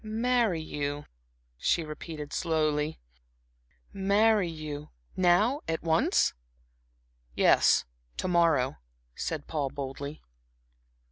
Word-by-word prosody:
"Marry 225 -3 +1
you," 145 -1 -4 0.5
she 170 - +1
repeated, 155 -1 -7
slowly. 155 -2 0 0.9
"Marry 200 0 +3
you 155 -2 -6 0.3
now 200 - +3
at 160 -1 -2
once?" 160 -1 +2 1.0
"Yes, - - +4 0.3
to - - -2
morrow," 165 -7 +2 0.4
said 155 - -4
Paul, 145 -4 -2
boldly. 140 +2 -6
160 Hz, 85 wpm, -29 LUFS, 150-190 Hz, 1.0 s, Yes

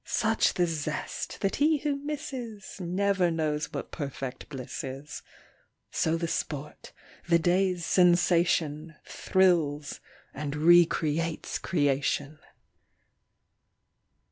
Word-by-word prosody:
Such 225 0 +1
the 175 - +3
zest 155 -2 -4
that 195 - 0
he 305 +2 +3
who 290 0 -1
misses 275 -7 -6
Never 185 +1 +1
knows 155 -2 -1
what - - -6
perfect 135 -4 -6
bliss 135 -4 -6
is. 135 +3 -7 0.7
So 165 +1 +1
the 170 0 -2
sport, 150 -2 -5 0.4
the 170 - +6
day's 180 0 +1
sensation, 170 -3 +2
Thrills 165 -6 +1 0.3
and 145 0 -4
recreates 165 0 +3
creation. 145 -1 0
170 Hz, 95 wpm, -28 LUFS, 150-190 Hz, 0.7 s, the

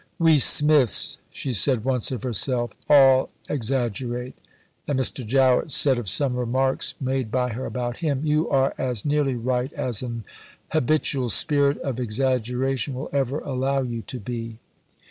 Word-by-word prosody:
"We 165 -4 +4
Smiths," 150 -3 +3
she 130 - -5
said 120 +2 +1
once 130 -3 +1
of 125 -5 -4
herself, 120 0 0 0.2
"all 135 -3 +6 0.2
exaggerate"; 125 -1 -2 0.5
and 145 -2 0
Mr. 130 0 -1
Jowett 130 +4 +2
said 135 -2 +3
of 110 -6 -4
some 135 +1 0
remarks 130 +2 0
made 130 -3 -2
by 125 +2 0
her 125 +3 -5
about 120 -1 -4
him: 145 -5 -1
"You 155 +1 +1
are 135 -1 +2
as 125 -5 -2
nearly 145 -3 +1
right 125 +2 -2
as 120 -5 -3
an 120 -3 -5 0.5
habitual 145 -3 0
spirit 145 - +3
of 130 -3 -4
exaggeration 125 +2 -1
will 130 - -6
ever 140 +1 -1
allow 135 0 -1
you 120 -2 -4
to 125 +2 -8
be." 115 +1 -6
130 Hz, 150 wpm, -23 LUFS, 120-140 Hz, 0.5 s, all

